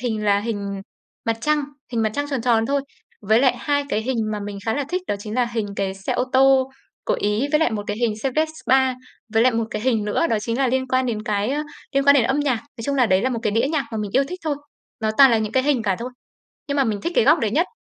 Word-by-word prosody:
hình 220 -4 -2
là 200 0 +3
hình 200 -3 -4 0.4
mặt 230 -1 0
trăng, 300 +1 +1 0.3
hình 225 -1 +1
mặt 215 - +1
trăng 285 0 -1
tròn 265 -4 -1
tròn 230 -2 +2
thôi, 280 0 +1 0.4
với 220 +3 +3
lại 255 -2 +3
2 285 +2 0
cái 220 -4 -1
hình 260 +1 -2 0.2
mà 210 - -3
mình 200 0 -6
khá 225 - +1
là 285 -1 -1
thích 365 +2 -2
đó - - -1
chính 210 +2 -7
là 250 - +2
hình 235 -3 -3
cái 195 -1 -1
xe 195 0 -3
ô 250 - 0
tô 265 0 +4 0.3
của - - +1
Ý 210 +6 +1
với 300 - +4
lại 320 - +3
một 210 -2 -3
cái 205 - -3
hình 230 -2 0
xe 270 - 0
Vespa, 265 -5 +2 0.4
với 225 - +5
lại 255 -1 +4
một 225 0 0
cái 215 - -4
hình 225 -4 +1
nữa 210 +10 +1
đó 225 - +1
chính 230 +3 -2
là 270 - +3
liên 260 +1 0
quan 255 0 +1
đến 215 -3 -2
cái, 210 +2 -1
ơ, 295 +2 -1 0.3
liên 275 0 +2
quan 280 0 +7
đến 250 -5 +4
âm 270 +4 +1
nhạc. 275 -4 +1
Nói 230 -1 -11
chung 280 - -1
là 255 -4 +3
đấy 190 -1 +2
là 260 - +1
một 235 - -2
cái 215 - +1
đĩa 230 +5 +1
nhạc 285 -5 0
mà 220 - -2
mình 205 -2 -3
yêu 275 - +4
thích 365 0 -7
thôi. 295 -3 0 0.4
Nó 220 -1 0
toàn 270 -2 +9
là 230 - +3
những 220 0 -3
cái 260 - +2
hình 280 -4 +1
cả 195 -4 0
thôi, 245 +2 -5 0.6
nhưng 285 0 -1
mà 275 - +4
mình 210 -4 -2
thích 340 - -2
cái - - +5
góc 310 +3 +5
đấy 220 -4 0
nhất. 335 +9 +2
240 Hz, 295 wpm, -22 LUFS, 215-275 Hz, 0.6 s, toàn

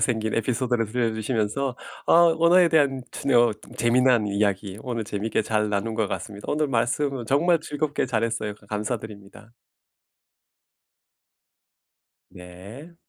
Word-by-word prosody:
생긴 110 -1 0
에피소드를 120 0 0
들려 115 0 -1
주시면서 115 +3 -2 0.3
아 - - +3 0.3
언어에 170 +1 +5
대한 140 -5 +2
춘 140 - -2
어 120 -1 +5 0.2
재미난 120 -1 +3
이야기 100 -1 -1
오늘 120 -3 -3
재미있게 105 +2 -2
잘 105 0 0
나눈 105 +2 -2
것 110 -2 0
같습니다. 105 -2 -6
오늘 150 0 +1
말씀을 125 +1 -1
정말 165 +7 +3
즐겁게 145 -2 -2
잘했어요. 115 -2 -2
가 105 -1 -22
감사드립니다. 105 -1 -6 2.8
네. 95 - -12
115 Hz, 290 characters per minute, -24 LUFS, 105-135 Hz, 2.8 s, 언어에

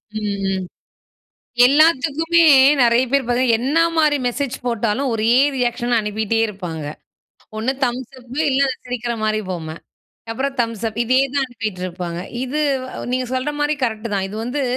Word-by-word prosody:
ம், 210 -2 -2
ம். 190 -1 -2 1.0
எல்லாத்துக்குமே 315 +3 +3 0.4
நெறைய 240 +1 +4
பேர் 280 -1 +3
பார்த்தீங்கன்னா, 245 -1 +2
என்னமாரி 310 +2 +2
மெசேஜ் 250 +1 -2
போட்டாலும் 235 +3 0
ஒரே 225 +1 +1 0.2
ரியாக்ஷன் 240 -1 0
அனுப்பிட்டே 220 +1 -1
இருப்பாங்க. 175 -7 -6 0.7
ஒண்ணு 230 +4 0
தம்ஸ்சப் 250 0 -4 0.2
இல்ல 270 0 +2 0.2
சிரிக்கிறமாரி 230 -3 -2
பொம்ம. 170 -4 -4 0.6
அப்புறம் 270 +4 -2
தம்ஸ்அப். 230 -1 -2
இதே 255 +2 +2 0.2
தான் 280 -1 +2
அனுப்பிட்டுருப்பாங்க. 185 -7 -5 0.2
இது 270 +4 -2 0.3
அ - - -7 0.2
நீங்க 255 0 -1
சொல்றமாரி 295 +3 -1
கரெக்ட்டு 225 -2 -2
தான். 195 -1 0
இது 205 - -7
வந்து 255 +4 -2
240 Hz, 125 wpm, -20 LUFS, 215-270 Hz, 1.0 s, நெறைய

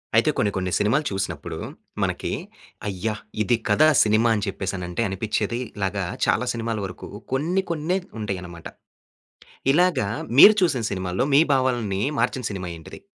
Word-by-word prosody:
అయితే - - +4
కొన్ని, 105 - +2
కొన్ని 95 -1 -2
సినిమాలు 135 +9 +1
చూసినప్పుడు 95 0 -4 0.5
మనకి, - - -2 0.6
అయ్యా! 105 +2 -2 0.3
ఇది 120 +1 +2
కదా 150 +10 +5 0.2
సినిమా 110 +2 +3
అని 105 - -1
చెప్పేసనంటే 95 0 -3
అనిపిచేది. 110 +4 -2 0.2
ఇలాగ 100 0 -2 0.3
చాలా 125 - +1
సినిమాల 115 -1 -3
వరకు 95 - -8 0.2
కొన్ని 170 +8 +1
కొన్నే 170 +3 0 0.2
ఉంటాయన్నమాట. 90 -5 -5 1.1
ఇలాగ 175 0 +3 0.4
మీరు 210 +7 +10
చూసిన 135 -10 +2
సినిమాల్లో, 95 +5 -1
మీ 140 - +8
భావాల్ని 120 -7 0 0.2
మార్చిన 130 - 0
సినిమా 90 -2 -5
ఏంటిది? 80 - -11
110 Hz, 130 wpm, -24 LUFS, 95-130 Hz, 1.1 s, మీరు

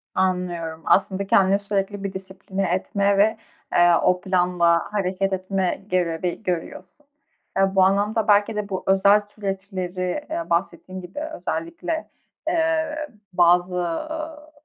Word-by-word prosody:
Anlıyorum. 175 -3 -1
Aslında 195 0 +2
kendini 195 +1 +4
sürekli 200 0 -2
bir 195 -1 -3
disipline 190 0 -4
etme 200 +1 +1
ve, 220 +2 +3 0.4
eee, 175 -1 +6
o 180 +1 +2
planla 180 -1 +2
hareket 195 -1 0
etme 185 0 -1
görevi 175 +1 -1
görüyorsun. 180 - -5 0.5
Ya, 195 0 +2
bu 190 - +6
anlamda 205 +3 +2
belki 205 +1 +4
de 210 -1 -3
bu 190 -2 -3
özel 200 +2 +5
süreçleri, 195 +1 -4
eee, 330 +1 -4
bahsettiğin 185 +1 -2
gibi 180 +9 -8
özellikle, 320 +1 -4 0.4
eee, 320 -2 +1 0.4
bazı, 175 +1 +4
ııı, 305 - -4
195 Hz, 125 wpm, -23 LUFS, 180-210 Hz, 0.5 s, eee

